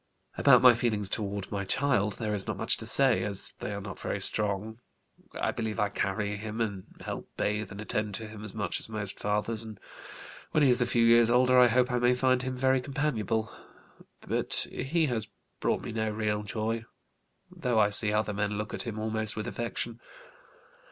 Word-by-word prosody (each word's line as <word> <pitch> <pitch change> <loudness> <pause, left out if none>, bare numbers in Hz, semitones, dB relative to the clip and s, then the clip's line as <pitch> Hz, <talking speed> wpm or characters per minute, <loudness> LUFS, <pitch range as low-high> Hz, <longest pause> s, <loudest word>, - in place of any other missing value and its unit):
"About - - +5
my 125 -1 +9
feelings 110 -4 0
toward 100 -2 -3
my 100 -1 -2
child 105 -1 +1
there 105 -1 -3
is 100 -2 -3
not - - -3
much - - +1
to - - -4
say, - - +3
as - - 0
they - - -4
are 100 - -4
not 100 -3 -8
very - - -3
strong. 105 +2 -1 0.6
I - - +1
believe 110 -2 -4
I 105 - +2
carry 105 +1 -2
him 110 +1 -6
and 100 -5 -2 0.2
help - - -6
bathe 105 -1 -1
and 100 - -8
attend 105 -1 -2
to 110 - -5
him 105 0 -10
as 105 -1 -7
much 110 - -2
as - - -4
most 105 -3 -5
fathers, 105 +2 -1
and 110 -2 -10 0.7
when 155 - +3
he 135 - +5
is 125 +1 +2
a 120 - +2
few 120 -1 +3
years 115 0 +6
older 125 +1 +5
I 125 - +8
hope 125 +2 +2
I 125 - +1
may 120 +1 +3
find 130 0 +2
him 130 0 -3
very 130 0 +2
companionable. 115 -6 -2 0.7
But - - +3
he 160 +6 0
has 115 -7 -2 0.3
brought - - 0
me - - -5
no 110 0 -1
real 105 -1 -1
joy, 110 +2 -3 0.7
though 120 -2 -1
I 105 -1 +4
see 105 +1 +6
other 105 0 0
men 105 0 -1
look 105 0 -4
at - - -3
him 110 -2 -4
almost 110 0 -2
with 110 - -4
affection. 120 0 -4
110 Hz, 200 wpm, -29 LUFS, 105-120 Hz, 0.7 s, my